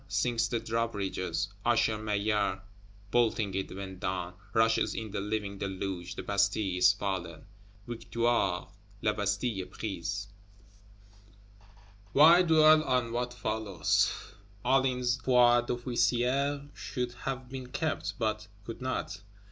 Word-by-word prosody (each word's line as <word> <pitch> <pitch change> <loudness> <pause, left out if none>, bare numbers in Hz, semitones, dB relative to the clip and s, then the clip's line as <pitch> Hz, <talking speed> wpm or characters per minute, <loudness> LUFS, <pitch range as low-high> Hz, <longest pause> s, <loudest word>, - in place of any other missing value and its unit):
Sinks 115 -2 +1
the 115 - -1
drawbridge, 115 -3 -2 0.4
Usher 115 -2 +3
Maillard 105 -2 0 0.5
bolting 110 -4 +2
it 95 0 -2
when 95 -1 -7
down; 90 -1 -3 0.2
rushes 115 0 +2
in 110 -2 -5
the 100 - -3
living 100 -1 -3
deluge; 95 -1 -4
the - - -5
Bastille 100 -2 +1
is 90 0 +7
fallen! 95 -4 -4 0.4
Victoire! 115 -4 0 0.4
La 105 - +2
Bastille 100 +1 -1
est 90 - -13
prise! 95 -1 -4 1.9
Why 165 +5 +8
dwell 155 -2 +6
on 125 -4 0
what 120 +1 -1
follows? 110 - +1 0.5
Hulin's 125 -1 +2
foi 120 -1 +5
d'officier 125 +3 0
should 125 -2 -4
have 130 +1 -5
been 130 -1 -6
kept, 100 - -3
but 110 -1 -2 0.2
could 115 +2 -7
not. 125 -7 -3
110 Hz, 115 wpm, -30 LUFS, 100-125 Hz, 1.9 s, Why